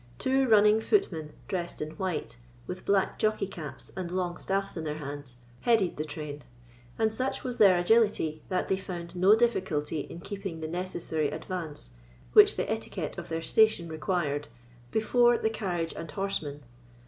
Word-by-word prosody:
Two 265 - +2
running 210 0 +6
footmen, 165 - 0
dressed 175 -3 -3
in 155 0 -4
white, 160 -8 -4 0.3
with 180 +1 -7
black 195 -1 +2
jockey 215 -2 +1
caps, 155 -8 -8
and 185 -2 -4
long 180 -1 -1
staffs 195 +2 -2
in 165 - -4
their 150 -1 -3
hands, 145 -3 -7 0.2
headed 220 - +2
the 155 - -2
train; 150 -1 -6 0.5
and 220 -1 +2
such 260 +4 -2
was 250 -1 -4
their 195 -4 +7
agility, 175 -5 +2
that 185 -1 0
they 190 - +1
found 180 -2 -7
no 190 +4 +6
difficulty 175 -10 0
in 165 - -7
keeping 195 -3 -6
the 160 - -4
necessary 165 -3 -2
advance, 155 - -6 0.4
which - - +8
the - - -1
etiquette - - -3
of - - -8
their 165 0 -2
station 220 -4 +3
required, 155 -3 -1 0.4
before 240 - +4
the 220 - 0
carriage 175 -7 -2
and 165 - -6
horsemen. 150 -7 -3
180 Hz, 160 wpm, -29 LUFS, 155-205 Hz, 0.5 s, which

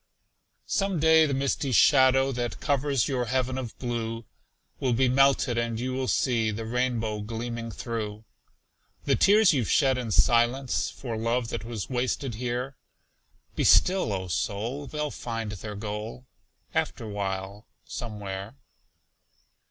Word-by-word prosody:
Some 195 -4 0
day 160 0 +5
the 140 - -1
misty 135 0 -1
shadow 130 +3 +5
That 120 -2 -3
covers 140 -3 +1
your 125 -3 -1
heaven 130 +1 -1
of 125 -4 -5
blue, 115 -2 -3 0.5
Will 130 -2 +1
melted 130 0 +3
be, - - +3
and 115 -1 -3
you 130 +1 -2
will 130 0 -2
see 115 -4 +1
The 110 +1 -4
rainbow 115 -2 -1
gleaming 115 +2 -5
through. 110 -1 -5 0.8
The - - +3
tears 210 -2 +5
you've 125 -6 0
shed 135 -3 +3
in 120 -3 -4
silence 120 +4 +2
For 120 -4 -6
love 115 +1 -1
that - - -4
was 115 -4 -5
wasted 130 0 -2
here 125 +3 -3 0.8
Be - - 0
still, 185 - +4
O 95 -2 -3
soul! 115 - -3
They'll 150 0 -3
find 115 -3 -4
their 105 +1 -7
goal, 105 +4 -6 0.5
Afterwhile, 100 -1 -3 0.2
somewhere. 105 -1 -6
120 Hz, 135 wpm, -27 LUFS, 110-130 Hz, 0.8 s, day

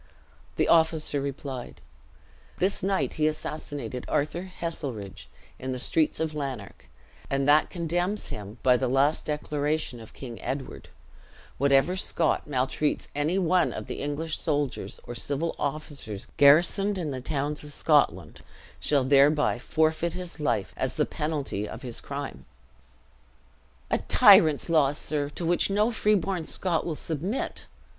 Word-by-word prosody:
The - - +1
officer 160 -3 +3
replied, 135 -2 -6 0.8
"This 190 +2 0
night 195 0 0
he 155 - +5
assassinated 145 -4 -4
Arthur 175 +6 -1
Heselrigge 115 - -5 0.3
in 130 0 -3
the - - -3
streets 155 +5 +1
of 160 -1 -1
Lanark; 135 -9 -6 0.4
and 135 0 0
that 150 +1 +5
condemns 175 +4 -2
him, 105 +2 -7
by 125 -1 +5
the 130 - 0
last 135 +5 +2
declaration 150 -3 -2
of 110 - -13
King 120 -4 -8
Edward: 135 0 -5 0.7
Whatever 140 +6 +3
Scot 170 -4 0
maltreats 140 +2 -1
any 150 +6 0
one 180 -1 +2
of - - -6
the - - -6
English 150 +3 -2
soldiers, 145 -4 -2
or 120 - -7
civil 145 +7 -2
officers 140 -8 -4
garrisoned 175 +8 +5
in 160 -5 -2
the 130 -1 -4
towns 145 +2 -2
of 150 - -6
Scotland, 95 - +2 0.4
shall 145 -3 +2
thereby 140 +1 +4
forfeit 160 +4 0
his 180 -4 -7
life, 105 -9 -1
as 130 -1 -2
the 150 - +2
penalty 145 -10 -3
of - - -8
his 120 -3 -5
crime." 140 0 -6 1.5
"A - - +2
tyrant's 155 -3 +6
law, 155 -4 +3
sir, 145 -1 -2
to 165 +4 -5
which 175 +3 +3
no 210 +4 +2
freeborn 195 -6 +1
Scot 175 -1 -1
will 165 - -2
submit! 170 - -3
150 Hz, 140 wpm, -27 LUFS, 135-165 Hz, 1.5 s, tyrant's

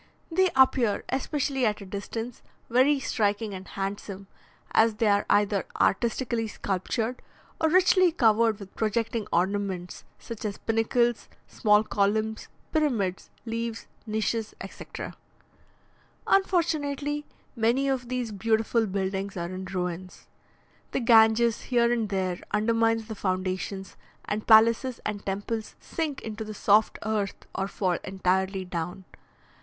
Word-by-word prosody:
They 375 +3 +3
appear, 260 -5 +4
especially 270 0 -1
at 210 -3 +1
a 200 - -9
distance, 225 +5 -5 0.3
very 270 +4 +4
striking 210 -4 0
and 190 0 -8
handsome, 195 0 -5 0.5
as 220 -1 +4
they 225 - 0
are 205 -1 +3
either 205 -2 +2
artistically 230 +1 +1
sculptured 220 +5 -2 0.4
or 320 - +3
richly 370 +1 +5
covered 225 - +3
with 200 -1 -11
projecting 225 0 -1
ornaments, 190 0 -1
such 230 -2 -8
as 205 -2 -3
pinnacles, 235 +1 +1 0.2
small 210 -1 +3
columns, 215 +1 0 0.2
pyramids, 235 - 0 0.2
leaves, 230 0 -3 0.2
niches, 220 +1 -1
etc. - - -8 1.1
Unfortunately, 295 -6 +1 0.3
many 240 +4 +2
of 255 -3 -1
these 250 -3 -2
beautiful 220 +2 +1
buildings 195 0 -2
are 170 +1 -3
in 185 0 -5
ruins. 180 -1 -5 0.7
The - - +1
Ganges 230 -1 +4
here 240 -2 +3
and 225 -3 -1
there 185 -2 -1
undermines 225 +1 +1
the 220 - -5
foundations, 190 0 -3 0.3
and 210 +1 -3
palaces 230 +3 +5
and 205 -1 -3
temples 205 +3 -3
sink 310 -4 -3
into 220 0 -5
the 215 0 -7
soft 210 +2 +3
earth 210 -3 -2
or 190 - -2
fall 185 -3 -1
entirely 190 0 0
down. 180 +2 -5
220 Hz, 125 wpm, -27 LUFS, 195-235 Hz, 1.1 s, richly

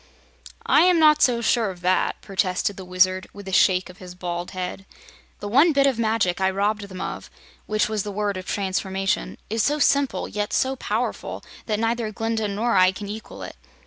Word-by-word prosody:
"I - - +5
am 360 0 +5
not 305 -1 +5
so 240 -2 +3
sure 230 -2 +2
of 180 -2 -9
that," 185 +1 +1
protested 195 0 -1
the 190 - -8
Wizard, 185 +1 +1
with 200 -1 -11
a - - -4
shake 185 0 +3
of 180 +1 -14
his 180 -1 -10
bald 175 -1 -4
head. 185 +1 -6 0.5
"The 205 - -4
one 285 +10 +4
bit 275 -1 +4
of 265 -4 +1
magic 220 -5 +1
I 190 - +3
robbed 205 +2 -1
them 185 -1 -8
of - - -5 0.4
which 215 0 +1
was 215 -1 -1
the 205 - -5
Word 205 0 -1
of 185 0 -7
Transformation 195 +1 -2
is 225 +1 -1
so 295 +7 +1
simple, 280 -2 +1
yet 210 0 -3
so 265 +1 +1
powerful, - - -3 0.2
that 215 -2 0
neither 230 -1 -1
Glinda 225 +1 -2
nor 215 +3 0
I 185 0 +5
can 200 +2 -8
equal 220 +1 -8
it. - - -8
205 Hz, 200 wpm, -23 LUFS, 185-230 Hz, 0.5 s, I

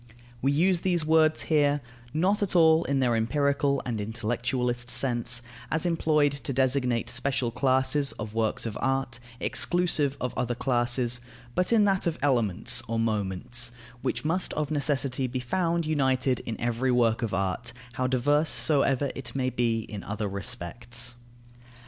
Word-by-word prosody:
We 135 - +2
use 170 +4 +2
these 175 -4 +1
words 155 0 +3
here, 145 -2 +2 0.3
not 185 - +1
at 200 -2 0
all 160 -1 +6
in 135 -1 +1
their 120 -2 +2
empirical 140 +3 +1
and 115 -4 -2
intellectualist 120 +3 -2
sense, 120 -1 0 0.3
as 160 +2 0
employed 155 -4 +2
to 140 0 -5
designate 125 -2 +1
special 125 -1 -1
classes 130 +3 +2
of 105 0 -7
works 110 0 -1
of 110 -2 -4
art, 135 -2 0 0.2
exclusive 160 -6 +1
of 125 - -3
other 120 0 -1
classes; 120 -1 0 0.3
but 180 - 0
in 225 -2 +5
that 195 -3 +1
of 165 -1 -1
elements 120 -9 +2
or 115 - -2
moments, 110 +2 0 0.3
which - - -2
must 165 +4 +1
of 150 -1 -2
necessity 140 -3 0
be 125 +1 -3
found 170 +5 0
united 130 -4 +1
in 115 - -4
every 120 +2 0
work 120 -1 +2
of 115 -3 -1
art, 95 +5 -2 0.2
how 130 -1 -1
diverse 145 +5 +2
soever 140 -3 +1
it 125 -2 -7
may 130 -1 0
be 115 -2 0
in 105 -2 -8
other 105 +1 -3
respects. 120 +3 -4
130 Hz, 155 wpm, -27 LUFS, 120-145 Hz, 0.3 s, all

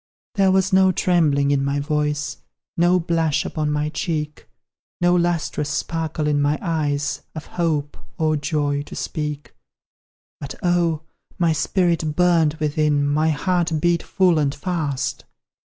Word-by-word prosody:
There 195 -4 +3
was 190 +1 +2
no 190 0 +5
trembling 155 -6 +2
in 140 -1 +2
my 140 +1 0
voice, 150 0 -1 0.4
No 175 +2 +3
blush 165 -3 0
upon 155 -1 -2
my 150 0 0
cheek, 155 -2 -4 0.5
No 175 0 +3
lustrous 170 -4 0
sparkle 160 0 -2
in 145 -1 +2
my 145 +1 +2
eyes, 150 -5 -1
Of 155 - -6
hope, 155 -4 -2 0.2
or 155 -1 +1
joy, 145 -1 -1
to 145 - -10
speak; 150 -2 -4 0.9
But, 140 -1 -7
oh! 170 -3 +1 0.4
my 170 -2 +2
spirit 165 -1 0
burned 170 -4 +3
within, 150 -2 +1
My 155 +2 +2
heart 165 +1 0
beat 170 +1 +2
full 180 -4 +2
and 140 -2 0
fast! 150 -5 -2
155 Hz, 135 wpm, -22 LUFS, 145-175 Hz, 0.9 s, no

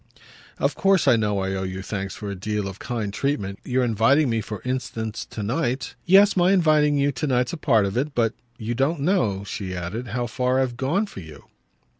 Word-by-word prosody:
"Of - - +1
course 195 -6 +2
I 130 - +7
know 105 -2 0
I 95 0 -1
owe 95 - -2
you 95 0 -4
thanks 100 -1 -4
for 105 -2 -6
a - - -4
deal 105 +2 -2
of 95 0 -8
kind 110 -5 -3
treatment. 100 -7 -2
Your 125 0 0
inviting 120 +5 +3
me 115 -1 0
for 105 0 -6
instance 115 -3 -3
to 105 - -6
night 125 +3 -1
!" - - -40
"Yes, 195 +3 +6
my 180 +1 +4
inviting 155 -5 +4
you 140 0 +2
to 135 +3 -3
night's 125 0 +1
a - - -3
part 115 -9 +3
of 95 - -3
it. 140 +4 -1
But 115 -1 +2 0.2
you 115 0 -3
don't 140 +5 0
know," 120 - +1
she 95 -2 -5
added, 90 +8 -4
"how 120 +1 -2
far 125 +3 0
I've 130 -2 0
gone 145 - 0
for 200 - -10
you." 80 -4 -11
120 Hz, 220 wpm, -24 LUFS, 100-140 Hz, 0.2 s, I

